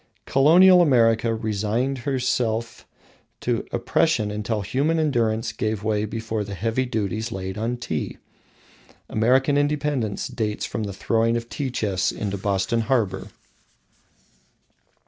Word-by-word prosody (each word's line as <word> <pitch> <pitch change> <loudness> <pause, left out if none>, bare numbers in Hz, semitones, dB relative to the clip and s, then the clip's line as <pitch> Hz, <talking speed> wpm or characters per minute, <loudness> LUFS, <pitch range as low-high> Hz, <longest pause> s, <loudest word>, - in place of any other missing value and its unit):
Colonial 180 +7 +6
America 115 -6 +3
resigned 110 +5 -1
herself 120 -3 -1 0.5
to - - -2
oppression 115 -11 +1
until 105 +1 -2
human 140 - 0
endurance 115 -7 0
gave 110 -1 -3
way 105 -1 0
before 110 0 -3
the 100 -1 -6
heavy 115 +6 -1
duties 110 0 -2
laid 95 -2 -5
on 115 +3 -2
Tea. 80 -10 -4 0.9
American 130 +6 +2
independence 145 -7 -1
dates 110 -5 -3
from 110 -2 -3
the 100 - -5
throwing 115 +4 +1
of 120 0 -6
tea 140 -3 -3
chests 100 -6 0
into 100 -1 -4
Boston 100 +3 0
harbour. 115 -5 0
115 Hz, 120 wpm, -23 LUFS, 105-130 Hz, 0.9 s, Colonial